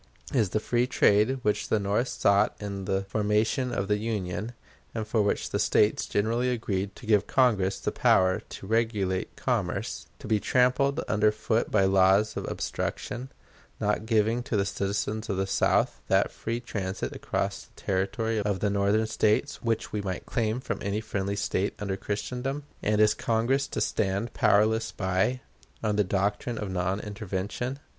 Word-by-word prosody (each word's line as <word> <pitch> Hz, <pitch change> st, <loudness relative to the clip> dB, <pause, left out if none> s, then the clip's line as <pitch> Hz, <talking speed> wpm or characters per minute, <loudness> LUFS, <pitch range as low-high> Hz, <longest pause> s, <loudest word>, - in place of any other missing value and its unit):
Is 115 Hz, -8 st, +2 dB
the 110 Hz, -, 0 dB
free 120 Hz, +3 st, +1 dB
trade 115 Hz, 0 st, +3 dB
which 105 Hz, 0 st, 0 dB
the 110 Hz, -, +2 dB
North 105 Hz, +5 st, 0 dB
sought 100 Hz, -3 st, +2 dB
in 100 Hz, -2 st, -5 dB
the 95 Hz, 0 st, 0 dB
formation 110 Hz, +5 st, 0 dB
of 100 Hz, -, -1 dB
the 105 Hz, 0 st, +1 dB
Union, 105 Hz, 0 st, -3 dB, 0.4 s
and 110 Hz, -1 st, -3 dB
for 110 Hz, 0 st, +2 dB
which 100 Hz, -, 0 dB
the -, -, 0 dB
States 105 Hz, -, +2 dB
generally 115 Hz, +5 st, +1 dB
agreed 100 Hz, -5 st, -2 dB
to -, -, -12 dB
give 105 Hz, -2 st, +3 dB
Congress 105 Hz, -8 st, +2 dB
the -, -, -2 dB
power 95 Hz, 0 st, +3 dB
to -, -, -8 dB
regulate 105 Hz, -4 st, 0 dB
commerce, -, -, -2 dB
to -, -, -12 dB
be 110 Hz, -1 st, +2 dB
trampled 130 Hz, -, +2 dB
under 105 Hz, 0 st, +3 dB
foot 110 Hz, +2 st, 0 dB
by 100 Hz, -3 st, +3 dB
laws 95 Hz, +2 st, +4 dB
of -, -, -3 dB
obstruction, 125 Hz, +2 st, -4 dB, 0.5 s
not 105 Hz, +1 st, 0 dB
giving 115 Hz, +1 st, +2 dB
to 120 Hz, -3 st, -2 dB
the 100 Hz, -, +2 dB
citizens 100 Hz, +2 st, -2 dB
of 95 Hz, -, -1 dB
the 95 Hz, -, +1 dB
South 95 Hz, -, +1 dB
that -, -, +3 dB
free 115 Hz, +1 st, -3 dB
transit 100 Hz, -6 st, -4 dB
across -, -, -2 dB
the -, -, -20 dB
territory 105 Hz, +4 st, -1 dB
of 100 Hz, -2 st, -1 dB
the 100 Hz, +1 st, +1 dB
Northern 100 Hz, +2 st, +2 dB
States 110 Hz, +6 st, +1 dB
which 115 Hz, -2 st, -1 dB
we 105 Hz, -, -2 dB
might 95 Hz, -3 st, -4 dB
claim 115 Hz, +1 st, -1 dB
from 115 Hz, -5 st, -4 dB
any 100 Hz, +1 st, -1 dB
friendly 100 Hz, -2 st, -2 dB
state 100 Hz, -1 st, -1 dB
under 100 Hz, -3 st, -2 dB
Christendom; 125 Hz, +8 st, -3 dB, 0.2 s
and 105 Hz, 0 st, +1 dB
is 105 Hz, 0 st, +5 dB
Congress 120 Hz, +6 st, +1 dB
to -, -, -4 dB
stand 100 Hz, +3 st, -1 dB
powerless 110 Hz, +2 st, +3 dB
by, 95 Hz, +7 st, 0 dB, 0.4 s
on 105 Hz, -2 st, +1 dB
the 105 Hz, -, +3 dB
doctrine 100 Hz, +5 st, -1 dB
of 105 Hz, -3 st, -4 dB
non 95 Hz, +2 st, -1 dB
intervention? 105 Hz, +4 st, -4 dB
105 Hz, 170 wpm, -27 LUFS, 100-115 Hz, 0.5 s, is